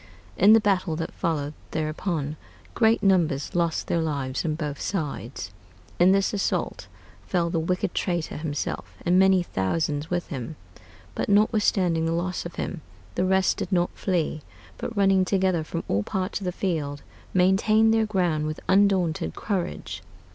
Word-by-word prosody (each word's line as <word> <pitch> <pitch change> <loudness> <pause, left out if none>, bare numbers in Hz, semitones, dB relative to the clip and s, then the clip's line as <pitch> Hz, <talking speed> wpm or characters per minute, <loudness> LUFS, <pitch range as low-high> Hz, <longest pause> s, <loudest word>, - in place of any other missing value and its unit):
In 210 +2 +6
the 225 - +7
battle 190 -6 +1
that 165 +1 -4
followed 150 -3 -2 0.2
thereupon, 155 -1 -2 0.4
great 225 -1 +3
numbers 170 -8 +2
lost 170 -2 0
their 170 - 0
lives 140 -5 -2
on 155 -2 -1
both 150 -3 -4
sides.... 135 - -4 0.5
In 180 +2 +6
this 195 +1 +2
assault 200 - -2 0.4
fell 170 -2 0
the 165 - +1
wicked 180 +4 -1
traitor 175 -3 -2
himself, 150 -1 -4
and 180 +1 +4
many 190 -1 +5
thousands 145 - -1
with 175 -1 -2
him. 140 +1 -5 0.6
But - - -2
notwithstanding 200 -5 +3
the 165 - 0
loss 175 +1 -2
of 170 - -13
him, 175 - -4 0.3
the 180 - 0
rest 190 0 +2
did - - -4
not 175 -1 +2
flee, 170 -5 -1 0.4
but 230 - -5
running 195 -1 +4
together 185 -3 +1
from 165 +2 -4
all 100 - +1
parts 185 - -2
of - - -5
the 180 - 0
field, 155 -7 -2 0.3
maintained 215 +4 +4
their 225 -1 +2
ground 175 -7 0
with 155 - -4
undaunted 185 - +2
courage. 175 - -3
175 Hz, 155 wpm, -25 LUFS, 155-190 Hz, 0.6 s, the